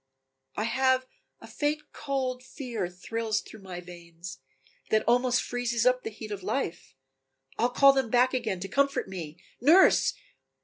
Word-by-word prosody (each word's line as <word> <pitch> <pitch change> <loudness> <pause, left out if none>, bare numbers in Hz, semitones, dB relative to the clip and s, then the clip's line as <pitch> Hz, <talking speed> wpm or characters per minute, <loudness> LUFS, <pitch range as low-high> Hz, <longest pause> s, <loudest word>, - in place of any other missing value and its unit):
"I 215 - 0
have 260 +2 +2 0.3
a - - -12
faint 300 +1 -2
cold 260 -3 -2
fear 235 - -4
thrills 215 +4 -2
through 220 - -12
my 180 -2 -7
veins, 175 0 -10 0.5
That 215 - +3
almost 245 +1 +3
freezes 240 -1 -1
up 250 0 +4
the - - -4
heat 215 0 -9
of 200 -2 -4
life. 190 - -3 0.6
I'll 240 - +3
call 275 +2 +6
them 265 -4 0
back 250 +2 +3
again 215 -7 -1
to 195 - -3
comfort 280 +4 +1
me. 170 -4 -7 0.2
Nurse! 330 +9 +5
235 Hz, 150 wpm, -28 LUFS, 195-260 Hz, 0.6 s, call